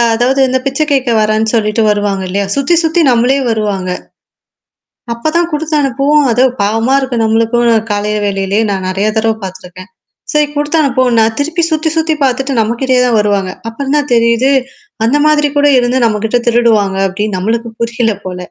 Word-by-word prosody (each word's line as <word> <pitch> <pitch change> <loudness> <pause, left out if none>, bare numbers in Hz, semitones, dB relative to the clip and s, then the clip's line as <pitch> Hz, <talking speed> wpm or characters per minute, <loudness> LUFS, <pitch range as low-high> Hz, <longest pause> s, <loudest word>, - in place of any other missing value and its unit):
அதாவது 255 +4 +1
இந்த 260 +1 0
பிச்சை 275 +3 0
கேட்க 265 -3 +1
வரேன்னு 215 +1 +1
சொல்லிட்டு 215 0 0
வருவாங்க 205 -2 -1
இல்லையா? 200 +1 -1
சுத்தி 280 +5 +1
சுத்தி 325 +2 +1
நம்மளே 245 +3 +2
வருவாங்க 205 -4 -2 1.2
அப்பதான் 325 +8 -1
குடுத்து 305 +1 -2
அனுப்பவோம். 280 +2 +1
அது 245 +3 +1 0.2
பாவமா 225 +5 0
இருக்கு 260 -3 -3
நம்மளுக்கும் 230 +2 +1 0.2
காலை 205 +1 -1
வேலைலயே 195 +1 -1
நான் 190 -1 -3
நெறைய 195 +3 -1
தடவ 220 0 +1
பார்த்துருக்கேன். 185 +1 -9 0.4
சரி 300 -1 +2
குடுத்தனு 295 +2 0
அனுப்பவோம்னா 255 -3 +1
நான் 220 0 0
திருப்பி 330 +4 -1
சுத்தி, 315 +1 0
சுத்தி 320 -1 +1
பார்த்துட்டு 270 +1 0
நம்மகிட்டயே 250 +3 0
தான் 235 -3 +2
வருவாங்க. 200 -3 0 0.2
அப்புறம் 275 +5 -3
தான் 290 -1 -2
தெரியுது. 235 +3 +2 0.5
அந்த 270 +6 +2
மாதிரி 300 -1 +2
கூட 290 0 +4
இருந்து 245 +1 0
நம்மகிட்ட 225 +2 0
திருடுவாங்க 220 -5 +2
அப்டின்னு 205 0 -3
நம்மளுக்கு 230 +3 -2
புரியல 230 -2 0
போல. 180 -1 -5
235 Hz, 160 wpm, -12 LUFS, 210-275 Hz, 1.2 s, கூட